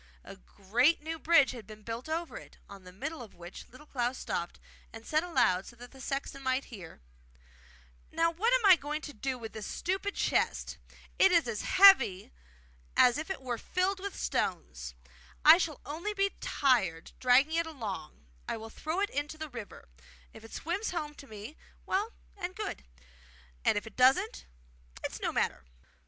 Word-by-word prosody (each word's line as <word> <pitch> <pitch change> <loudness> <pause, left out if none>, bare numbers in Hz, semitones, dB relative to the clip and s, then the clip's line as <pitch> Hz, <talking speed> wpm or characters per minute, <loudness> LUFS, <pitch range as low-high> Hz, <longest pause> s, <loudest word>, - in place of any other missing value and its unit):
A - - -10
great 230 - +1
new 325 +1 -4
bridge 315 -4 +5
had 230 -5 -9
been 215 -1 -12
built 230 +6 -6
over 330 +1 -3
it, - - -11
on 200 -2 -12
the 180 - -10
middle 280 - -5
of 225 - -11
which 175 +1 -10
Little 255 +5 -15
Klaus 250 -3 -2
stopped, 170 0 -4 0.3
and 225 0 -11
said 310 +1 +1
aloud 195 - +2
so 240 - -11
that 245 +1 -12
the 265 - -13
sexton 275 +1 -4
might 260 0 0
hear: 170 - -10 1.1
'Now, 330 +1 +2
what 415 +9 +1
am - - +3
I 375 -3 +9 0.2
to 300 -2 -8
do 260 +4 -3
with 225 -2 -8
this 215 -1 -6
stupid 385 +3 -2
chest? - - 0 0.4
It 385 - +7
is 340 -6 +4
as 220 -3 -3
heavy 265 - +6 0.7
as 250 +4 +6
if 315 - -5
it 380 -8 -4
were 245 -3 -3
filled 375 +1 0
with 400 +1 -6
stones! 65 - -2 0.5
I 315 +3 +10
shall 320 -5 -2
only 340 +9 -4
be 395 0 +2
tired, 190 - +1
dragging 260 +5 +4
it 335 0 +1
along; 220 - -7 0.2
I - - -2
will 225 0 -9
throw 320 - -3
it 405 - 0
into 290 +2 -3
the 315 0 -6
river. 235 -5 -9 0.5
If - - -13
it 225 - -12
swims 370 +7 -2
home 305 -4 -3
to 280 - -13
me, 215 +7 -9 0.3
well 410 +4 0 0.2
and 370 -2 -5
good; 425 - -5 0.8
and - - +3
if 205 - -3
it 225 - -12
doesn't, 265 - +3 0.6
it's - - -4
no - - 0
matter. - - -1
275 Hz, 180 wpm, -31 LUFS, 225-335 Hz, 1.1 s, I